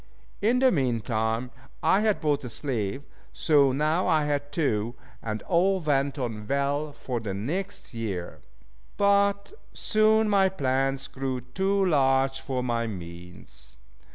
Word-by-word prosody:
In 230 +5 +3
the 260 0 +4
mean 125 - +1
time 115 +2 -1 0.3
I 190 - +4
had 210 -6 +1
bought 150 -3 +1
a 125 - -5
slave, 120 -1 -3 0.3
so 145 -4 +4
now 155 +6 +1
I 155 -2 +3
had 145 -1 -2
two, 120 -7 0 0.3
and 110 -1 -4
all 190 +2 +2
went 140 -3 0
on 110 -5 -4
well 140 +2 0
for 125 -3 -4
the 105 -4 -4
next 155 - -4
year. 100 -7 -4 0.6
But 200 - +2 0.2
soon 215 0 +3
my 195 -2 +4
plans 135 -5 0
grew 130 -1 -4
too 190 +10 0
large 135 -4 +2
for 130 -2 -3
my 115 -1 -1
means. 85 - -10
135 Hz, 140 wpm, -26 LUFS, 115-170 Hz, 0.6 s, the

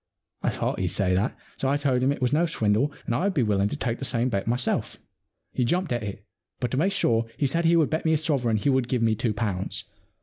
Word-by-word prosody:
I - - +1
thought - - -2
he'd 95 - 0
say 90 +1 +1
that. 100 +7 0 0.2
So 135 - 0
I 140 - +2
told 135 -3 +1
him 130 - +3
that 140 - +2
it - - -14
was 125 +2 +1
no 170 +3 +3
swindle 115 -1 +1
and - - -1
I 130 +11 0
would 200 - 0
be 135 - +3
quite 110 - -1
willing 100 0 +2
to - - -3
take 120 -4 -2
the - - -5
same 125 -1 +1
bet 100 -4 -2
myself. 120 +1 -1 0.6
He 125 - 0
jumped 175 +4 0
at 120 - -1
it, 100 -1 -6 0.3
but 125 - -2
to 130 - -1
make 185 +7 +2
sure 115 -12 +1
he 145 - +1
said 165 +5 +1
he 170 +1 +5
would 160 -3 +3
bet 160 - 0
me 160 - +2
a - - +4
sovereign 135 -8 +1
he 105 - 0
would 130 -2 +1
give 125 -2 0
me 110 -1 +3
two 110 0 -1
pounds. 100 -4 -3
125 Hz, 280 wpm, -26 LUFS, 110-145 Hz, 0.6 s, he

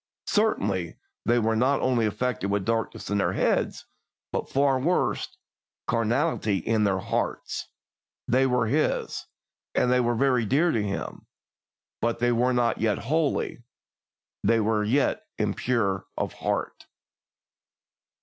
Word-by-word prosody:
Certainly, 100 - +1 0.3
they 120 - +3
were 110 -1 +2
not 130 +5 +2
only 120 -4 +2
afflicted 110 -2 -2
with 100 -1 0
darkness 115 -2 -2
in 105 - +2
their - - +1
heads, - - 0 0.5
but, - - -3
far 135 -1 +2
worse, 170 +7 0 0.5
carnality 115 -1 +1
in 110 +4 +1
their 95 -2 +2
hearts; 95 - -3 0.6
they 130 +2 +3
were 125 -2 +2
His, 145 +7 0 0.5
and 125 - +3
they 125 - +4
were 120 -1 +1
very 125 -1 +2
dear 145 +10 +2
to 115 - +1
Him, 100 -1 -4 0.7
but 115 0 0
they 120 0 +2
were 120 +2 +2
not 120 -1 +1
yet 110 -2 +2
holy, 155 -4 -1 0.8
they 115 - +3
were 110 0 +1
yet 130 +7 +1 0.2
impure 100 -6 0
of - - -2
heart. - - -3
120 Hz, 130 wpm, -26 LUFS, 105-130 Hz, 0.8 s, they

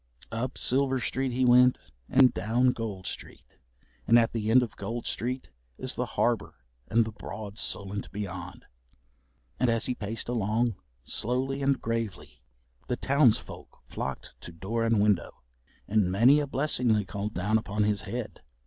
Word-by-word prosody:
Up 120 +3 -3
Silver 135 0 +2
Street 130 +2 -1
he 130 +1 +1
went, 125 - +4 0.2
and 130 -1 +6
down 120 +4 +2
Gold 105 -6 -5
Street, - - -8 0.5
and 115 - +7
at 115 -1 +3
the 110 -2 -2
end 125 +2 +6
of 115 - -6
Gold 115 +4 -5
Street 125 +2 -3 0.3
is - - -2
the - - -2
harbour - - +1 0.3
and 115 0 +3
the 110 - -5
broad 105 0 -8
Solent 100 0 -4
beyond. 90 -3 -6 0.9
And 125 - +3
as 115 0 +1
he 125 - +1
paced 110 -1 -4
along, 115 0 +1 0.3
slowly 130 +4 -1
and 140 0 +2
gravely, 110 - -4 0.5
the 125 - -1
townsfolk 140 -4 +1
flocked - - -5
to - - -9
door 100 +8 -3
and 115 -2 +2
window, 100 -9 +1 0.4
and 100 -3 +2
many 120 +9 +6
a 145 - -1
blessing 135 -4 +1
they 105 -2 +1
called 100 +2 -4
down 105 +5 +2
upon 105 0 -1
his 105 -1 +1
head. 120 +2 -6
115 Hz, 155 wpm, -28 LUFS, 105-125 Hz, 0.9 s, and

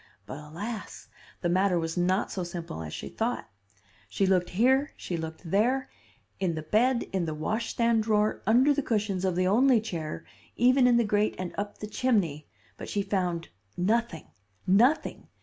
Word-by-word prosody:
But 140 - -7
alas! 195 +10 -7 0.3
the 175 - 0
matter 185 +1 +2
was 165 -1 -2
not 185 +2 +1
so 185 - -3
simple 170 - -6
as 80 -2 -6
she - - -6
thought. - - -3 0.6
She 195 - +1
looked 185 -2 +2
here, 265 +9 +2
she 175 - -4
looked 160 +1 -6
there; 250 +7 +1 0.5
in 180 -4 0
the 155 - -5
bed, 235 +9 +2
in 185 -3 0
the 155 -1 -3
washstand 225 +6 0
drawer, 215 -1 +1
under 255 +6 +5
the 285 - 0
cushions 210 -6 -1
of 185 -2 0
the 185 +1 +1
only 240 +6 +4
chair, 165 -8 -5 0.3
even 255 +1 +4
in 240 -1 +5
the 235 - +4
grate 210 0 +1
and 180 -1 -5
up 205 0 -4
the 210 - -6
chimney; 200 - 0 0.3
but - - -8
she 205 - -1
found 180 -4 -2 0.3
nothing 205 -2 0 0.4
nothing! 235 - +2
200 Hz, 170 wpm, -28 LUFS, 175-230 Hz, 0.6 s, under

